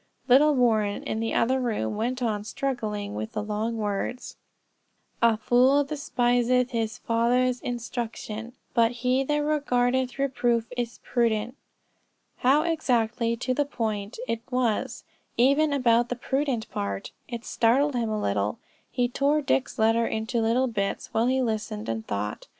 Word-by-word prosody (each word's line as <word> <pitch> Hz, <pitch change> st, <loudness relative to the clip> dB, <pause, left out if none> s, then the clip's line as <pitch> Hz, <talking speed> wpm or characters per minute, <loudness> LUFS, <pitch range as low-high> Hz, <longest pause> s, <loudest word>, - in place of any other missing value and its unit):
Little 285 Hz, +4 st, +6 dB
Warren, 220 Hz, -5 st, +2 dB
in 220 Hz, -, -3 dB
the 225 Hz, 0 st, -2 dB
other 260 Hz, +3 st, +2 dB
room, 215 Hz, -, -1 dB
went 245 Hz, +4 st, -2 dB
on 210 Hz, -3 st, -1 dB
struggling 215 Hz, -5 st, -3 dB
with 220 Hz, +1 st, -5 dB
the 210 Hz, -2 st, -2 dB
long 215 Hz, +2 st, -2 dB
words, 210 Hz, +3 st, -3 dB, 0.9 s
"A 230 Hz, -2 st, +4 dB
fool 255 Hz, +6 st, +4 dB
despiseth 250 Hz, -3 st, +1 dB
his 225 Hz, -2 st, -2 dB
father's 245 Hz, +2 st, +1 dB
instruction: 235 Hz, -1 st, -5 dB, 0.2 s
but 230 Hz, -2 st, +4 dB
he 255 Hz, +2 st, +3 dB
that 295 Hz, +2 st, 0 dB
regardeth 260 Hz, -4 st, +1 dB
reproof 245 Hz, -4 st, +1 dB
is 240 Hz, -1 st, -3 dB
prudent." 235 Hz, 0 st, 0 dB, 0.8 s
How 275 Hz, +4 st, +3 dB
exactly 240 Hz, -8 st, 0 dB
to 255 Hz, +2 st, -1 dB
the 290 Hz, -, +1 dB
point 220 Hz, -6 st, -3 dB
it 230 Hz, -, -2 dB
was, 250 Hz, -4 st, -1 dB, 0.3 s
even 280 Hz, +5 st, +4 dB
about 240 Hz, -3 st, +3 dB
the 245 Hz, -, -1 dB
prudent 265 Hz, -2 st, -1 dB
part. 100 Hz, -1 st, -4 dB, 0.2 s
It 235 Hz, -2 st, -6 dB
startled 270 Hz, +6 st, +2 dB
him 235 Hz, -3 st, -1 dB
a 215 Hz, -1 st, -1 dB
little. 100 Hz, -, -1 dB, 0.3 s
He 245 Hz, -1 st, 0 dB
tore 285 Hz, +4 st, +1 dB
Dick's 265 Hz, -1 st, 0 dB
letter 225 Hz, +1 st, +3 dB
into 220 Hz, +2 st, -1 dB
little 230 Hz, +4 st, +2 dB
bits, 200 Hz, -5 st, -3 dB
while 225 Hz, +2 st, +2 dB
he 260 Hz, 0 st, +2 dB
listened 215 Hz, -, -3 dB
and 110 Hz, -1 st, -3 dB
thought. 105 Hz, +1 st, -4 dB
240 Hz, 145 wpm, -26 LUFS, 220-255 Hz, 0.9 s, Little